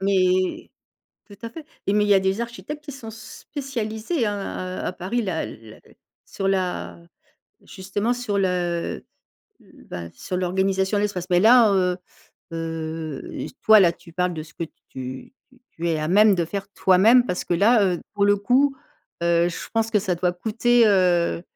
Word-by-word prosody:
Mais 185 -1 +1 0.6
tout 205 - -14
à 230 - -5
fait 305 +6 -10 0.2
et 200 - +2
mais 210 0 +3
il - - -1
y 200 - +6
a 190 - +5
des 190 +3 0
architectes 295 +6 -6
qui 285 - -7
sont 230 -4 -9
spécialisés 230 +2 -4
hein, 195 -2 -4
heu, - - -3
à - - -2
Paris 195 +7 -2
là, 185 -6 -2
la 110 -1 -12 0.5
sur 195 - -4
la, 180 - -2 0.7
justement, 205 +5 -2
sur 240 -5 -2
le 180 -3 -1 0.6
l - - -19
bah 85 -1 -7
sur 185 - -5
l'organisation 190 +2 0
de - - +1
l'espace. 185 -4 -2
Mais 175 0 +4
là, 230 -1 +6
heu 180 -2 +2 0.6
heu, 160 -2 -4 0.2
s - - -9
toi 220 -1 +8
là, 175 -3 +5
tu 170 -1 -17
parles 180 0 0
de 155 -1 -5
ce 155 - -17
que 170 - -4
t - - -19 0.2
tu 130 - -8 0.2
tu 255 -1 -24
tu 170 +1 -3
es 160 -2 0
à 155 - -2
même 205 +2 +5
de 170 -2 0
faire 195 +3 -5
toi-même, 220 +7 +5
parce 180 -6 -2
que - - 0
là, 210 +5 +4
heu, 180 -2 -1
pour 200 -1 +2
le 205 0 +5
coup, 265 +7 +2 0.5
heu, 170 0 +3
je - - -7
pense 225 0 0
que 210 - +3
ça 185 -2 -1
doit 180 +1 0
coûter, 230 +4 +2
heu, 180 -4 +2
190 Hz, 190 wpm, -23 LUFS, 175-220 Hz, 0.7 s, toi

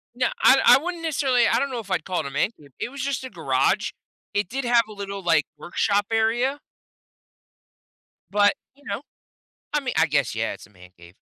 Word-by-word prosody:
No, 250 0 +1 0.2
I 270 - +7
I - - +8
wouldn't 345 -1 -4
necessarily 270 -6 +2
I - - +3
don't 280 - -1
know 250 - -3
if 205 -4 -8
I'd - - 0
call 185 -2 -1
it 155 - -4
a - - -5
"man 140 - +1
cave." 145 -2 -17
It - - -2
was, 275 0 -6
just, 270 -1 -2
a 260 - -6
garage. - - +1 0.4
It 205 -3 0
did 270 +4 -3
have 240 -1 +4
a - - -9
little, 200 -1 -6
like, 165 -4 +3
workshop 200 +3 0
area 240 +5 +1 1.7
but, 205 0 +4 0.2
you 285 +1 -24
know, 200 +3 -4 0.7
I 295 - +2
mean 260 -3 -3
I 160 - +5
guess, 140 -6 0
yeah, 115 0 -1
it's - - -11
a - - -24
man 90 -2 -17
cave. 85 +1 -16
215 Hz, 215 wpm, -24 LUFS, 170-265 Hz, 1.7 s, I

